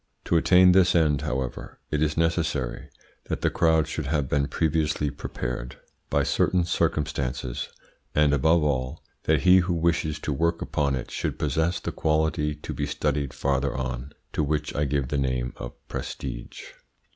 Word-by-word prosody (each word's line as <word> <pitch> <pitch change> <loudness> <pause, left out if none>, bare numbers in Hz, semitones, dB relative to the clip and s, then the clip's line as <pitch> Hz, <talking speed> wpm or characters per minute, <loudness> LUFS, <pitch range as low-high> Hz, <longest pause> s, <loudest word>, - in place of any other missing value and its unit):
To - - +1
attain 90 +2 +6
this 90 -1 +4
end, 75 -4 +3
however, 65 -1 -4
it 75 - 0
is 75 0 +1
necessary 80 -6 -1 0.4
that - - -3
the - - +2
crowd 80 -3 +3
should 80 -2 -4
have 75 -2 0
been 70 +1 +1
previously 75 -2 0
prepared 60 0 -5 0.3
by - - +2
certain 90 -1 +2
circumstances, 65 -7 -1 0.5
and, 75 -1 +4
above 80 +3 +3
all, 65 0 -1 0.2
that - - +3
he 95 0 +7
who 90 -1 +2
wishes 80 -2 +1
to 75 - -2
work 85 +3 +1
upon 70 -2 0
it 65 - -6
should - - -3
possess 80 +2 0
the - - -4
quality 75 -1 0
to 75 - -7
be - - -2
studied 70 -2 -1
farther 70 -1 -1
on, 65 +1 -4 0.2
to - - 0
which 75 0 -1
I 75 - +1
give 70 -2 -1
the 75 - 0
name 65 -2 -1
of - - -7
prestige. - - -6
75 Hz, 165 wpm, -26 LUFS, 70-80 Hz, 0.5 s, he